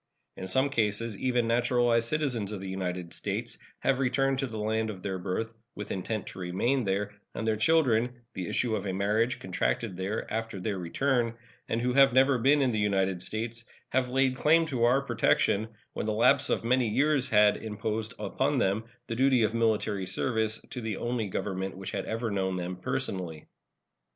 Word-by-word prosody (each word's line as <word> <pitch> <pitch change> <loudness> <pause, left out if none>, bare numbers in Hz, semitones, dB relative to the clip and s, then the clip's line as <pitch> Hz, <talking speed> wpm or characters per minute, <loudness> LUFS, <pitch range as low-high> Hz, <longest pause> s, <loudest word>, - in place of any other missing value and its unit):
In 95 - -6
some 135 +6 +3
cases 110 -2 +1
even 125 +1 0
naturalized 120 0 +3
citizens 125 -8 0
of 105 - -4
the 95 - -6
United 90 -2 -4
States - - -3 0.2
have 135 -1 +2
returned 135 +1 +1
to 135 - 0
the 110 -2 -6
land 110 +1 0
of 95 -3 -7
their 95 -2 -3
birth, 100 +5 -3 0.2
with 105 - -6
intent 100 +2 -3
to - - -10
remain 105 +9 0
there, 100 +1 -1 0.2
and 110 - -3
their 110 -1 +2
children, 125 -3 +2
the 90 -2 -4
issue 115 -3 0
of 105 -1 -3
a 95 - -1
marriage 105 +5 +1
contracted 95 +2 -2
there 95 +4 -2
after 115 -3 -3
their 95 +1 -2
return, 115 +6 0 0.3
and 115 - 0
who 125 +1 0
have 135 -1 +6
never 130 0 +4
been 140 +4 +4
in 130 - +2
the 110 - -1
United 95 -3 +1
States, 115 +3 -4 0.3
have 130 0 +1
laid 130 0 +2
claim 160 +5 +4
to 125 -6 +1
our 125 +3 +4
protection 110 -5 +2 0.3
when - - -3
the 110 - +1
lapse 130 +5 +4
of - - 0
many 125 +1 +2
years 140 +3 +2
had 105 -3 +5
imposed 110 0 -3
upon - - 0
them 100 +4 +1 0.2
the 115 - -4
duty 130 -1 +4
of 110 +1 +1
military 110 -4 0
service 110 +2 0
to 125 - -5
the 110 -3 -3
only 120 -2 -2
government 95 -1 -3
which 95 -1 -6
had - - -3
ever 115 0 -2
known 95 -2 -1
them 90 0 -3
personally. 90 -3 -3
110 Hz, 190 wpm, -29 LUFS, 100-125 Hz, 0.3 s, have